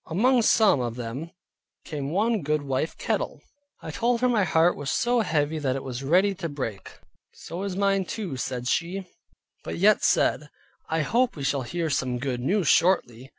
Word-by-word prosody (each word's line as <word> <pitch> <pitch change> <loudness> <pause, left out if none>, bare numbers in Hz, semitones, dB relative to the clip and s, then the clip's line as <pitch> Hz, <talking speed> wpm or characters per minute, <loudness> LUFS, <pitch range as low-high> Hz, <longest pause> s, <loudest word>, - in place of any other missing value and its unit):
Among 240 +9 +3
some 215 - +4
of 120 -1 -3
them 125 +7 -5 0.6
came 145 -4 -4
one 210 +5 +1
goodwife 145 -1 -1
Kettle. - - -2 0.4
I - - -5
told 235 0 0
her 250 - +3
my 225 -5 +2
heart 170 0 +3
was 145 -2 -5
so 240 - +1
heavy 155 -6 0
that 130 -3 -1
it 135 - -4
was 130 -1 -5
ready 180 +8 +3
to 180 -3 -5
break. 130 -9 -6 0.4
"So 170 +3 -7
is 195 -2 -3
mine 195 -1 +1
too," 190 -7 -5
said 125 -1 -4
she, 180 +6 -1 0.6
but - - -5
yet 205 +4 +4
said, 150 - +2 0.4
"I 160 0 +1
hope 235 - +1
we 145 - -6
shall 135 0 0
hear 165 +5 -3
some 130 -2 -1
good 125 -1 -3
news 180 +6 +1
shortly." 135 -9 +2
160 Hz, 180 wpm, -25 LUFS, 135-195 Hz, 0.6 s, some